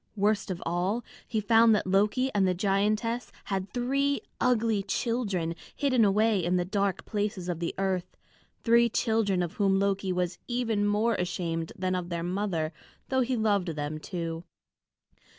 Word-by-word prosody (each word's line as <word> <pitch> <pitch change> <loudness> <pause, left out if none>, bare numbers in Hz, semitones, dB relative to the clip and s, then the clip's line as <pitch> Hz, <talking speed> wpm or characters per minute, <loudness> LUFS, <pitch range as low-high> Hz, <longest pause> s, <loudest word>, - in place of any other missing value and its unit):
Worst 205 0 +1
of 180 -2 -4
all, 180 +7 0 0.2
he 220 - -1
found 225 +1 +5
that 210 - 0
Loki 210 +8 +2
and 195 -2 +3
the 180 - +1
giantess 210 +5 0
had 195 -1 -3
three 275 +3 0 0.2
ugly 230 -4 +2
children 195 -5 -1 0.2
hidden 255 -5 +2
away 210 -1 +3
in 175 +2 +1
the 175 - 0
dark 200 0 -1
places 205 -4 -2
of 175 -2 -2
the 170 - -3
earth, 190 -2 -2 0.5
three 235 0 +5
children 215 -5 +1
of 170 - -4
whom 195 -2 +3
Loki 195 -1 0
was 180 -1 -1
even 230 -4 0
more 215 +3 +2
ashamed 175 -3 -2
than 185 0 -1
of 180 -1 -3
their 170 -1 -3
mother, 175 -3 -1 0.4
though 260 -1 +2
he 255 +1 0
loved 205 -4 +1
them 150 +1 -3
too. 165 -1 -4
200 Hz, 160 wpm, -28 LUFS, 180-225 Hz, 0.5 s, found